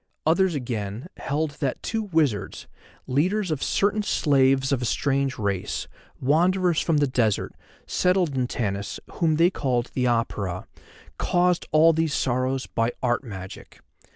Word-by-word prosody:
Others 175 +2 +3
again, 115 -2 -4
held 150 +2 -1
that 135 -4 -2
two 225 - -1
wizards, 160 - -1 0.4
leaders 180 +8 0
of 150 - -2
certain 205 +2 +1
slaves 135 -7 +2
of 135 -2 +1
a - - -1
strange 135 +1 0
race, 100 -4 -2 0.3
wanderers 175 +5 +2
from 165 -3 +1
the 145 - +3
desert, 120 -6 0 0.3
settled 180 -5 +1
in 125 -1 0
Tanis, 100 -5 -3
whom 160 -3 +1
they 170 +3 +4
called 125 -7 -1
the 125 - 0
Apura, 105 -6 -1 0.5
caused 180 -1 +1
all 160 +2 +6
these 160 -2 0
sorrows 130 +1 0
by 115 +1 -1
art 120 +2 +1
magic. 95 -6 -9
135 Hz, 140 wpm, -25 LUFS, 120-165 Hz, 0.5 s, all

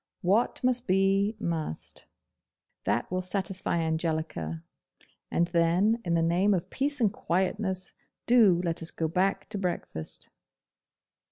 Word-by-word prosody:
What 205 +9 +2
must 250 -1 +1
be, 195 +3 +3
must. 160 - -3 0.8
That - - 0
will 185 0 0
satisfy 185 -1 -1
Angelica, 160 - -2 0.7
and 170 - +2
then, 175 +7 +2
in 170 -3 0
the 165 - +2
name 180 +5 +3
of 175 - -4
peace 285 +1 -1
and 215 -5 +2
quietness, 190 +1 -1 0.3
do 220 -8 +5
let 170 -1 -1
us 165 - -2
go 160 - -2
back 185 +4 0
to 210 -2 -4
breakfast. 175 - -4
185 Hz, 125 wpm, -28 LUFS, 165-200 Hz, 0.8 s, do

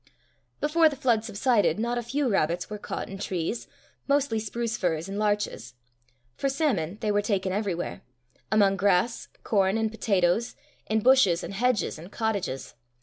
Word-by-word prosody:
Before 315 +2 +4
the 290 - -6
flood 235 -5 +1
subsided, 225 0 +2
not 235 +2 -1
a - - -2
few 265 +4 -1
rabbits 175 -3 0
were 210 - -5
caught - - -5
in 195 0 -8
trees, 185 +3 -3 0.4
mostly 280 -5 +2
spruce 225 +1 -3
firs 165 -2 -1
and 195 +1 -4
larches. 210 - -1 0.6
For 275 - -1
salmon, 230 - 0
they 215 - +1
were 205 0 +2
taken 195 -3 -1
everywhere 190 -4 -2 0.5
among 200 -2 +4
grass, 200 +4 +1 0.2
corn, 195 -1 +2
and 220 -1 0
potatoes, 215 +1 +1 0.3
in 220 0 +1
bushes, 225 -9 +5
and - - -6
hedges, 235 -5 0
and 175 +5 -11
cottages. 205 - -2
210 Hz, 155 wpm, -27 LUFS, 195-235 Hz, 0.6 s, bushes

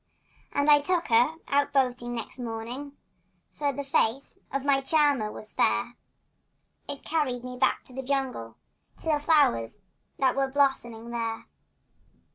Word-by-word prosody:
And 285 +1 +1
I 295 -1 +7
took 345 +2 0
her 240 +7 +4
out 285 0 +1
boating 250 -3 +1
next 230 +2 -6
morning, 240 +4 -5 0.6
For 290 -1 0
the 285 +1 -5
face 270 -1 0
of 275 0 -2
my 275 -1 +3
charmer 280 -6 +2
was 215 - -10
fair; 235 +1 +1 1.0
It 280 - -5
carried 270 -6 -1
me 250 0 -6
back 250 - +1
to 255 - -7
the 265 - -4
jungle— 260 - -2 0.4
To - - -15
the 310 -2 +2
flow'rs 210 - +2 0.3
that 260 -2 +2
were 270 0 +1
blossoming 265 -4 0
there. 230 -1 -3
265 Hz, 145 wpm, -27 LUFS, 235-285 Hz, 1.0 s, I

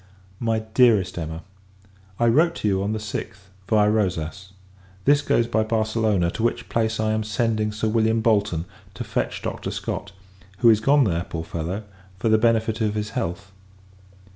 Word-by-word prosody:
MY 115 -1 0
DEAREST 110 -9 +4
EMMA, 80 +1 -5 0.8
I 120 - +3
wrote 160 +9 +4
to - - -2
you, 95 -1 +1
on 100 +2 -1
the 110 - -1
6th, 105 -2 -6 0.2
viâ 105 -1 +3
Rosas: 95 -2 -2 0.5
this 145 0 +5
goes 120 -4 +2
by 115 -1 +1
Barcelona; 110 -4 +1
to - - -5
which 115 - -1
place 110 -1 0
I 110 0 +1
am 110 0 0
sending 110 0 0
Sir 110 +1 -2
William 110 0 +2
Bolton, 100 -7 +1 0.3
to - - -4
fetch - - -3
Dr. - - -4
Scott, - - -4 0.5
who 120 +1 +6
is 110 - +3
gone 140 +5 +4
there, 85 -6 0
poor 80 -1 -5
fellow, 85 +6 -4 0.3
for 115 - 0
the 110 0 +4
benefit 110 -1 +1
of 105 -1 0
his 105 0 -3
health! 95 -5 -4
110 Hz, 170 wpm, -23 LUFS, 95-115 Hz, 0.8 s, who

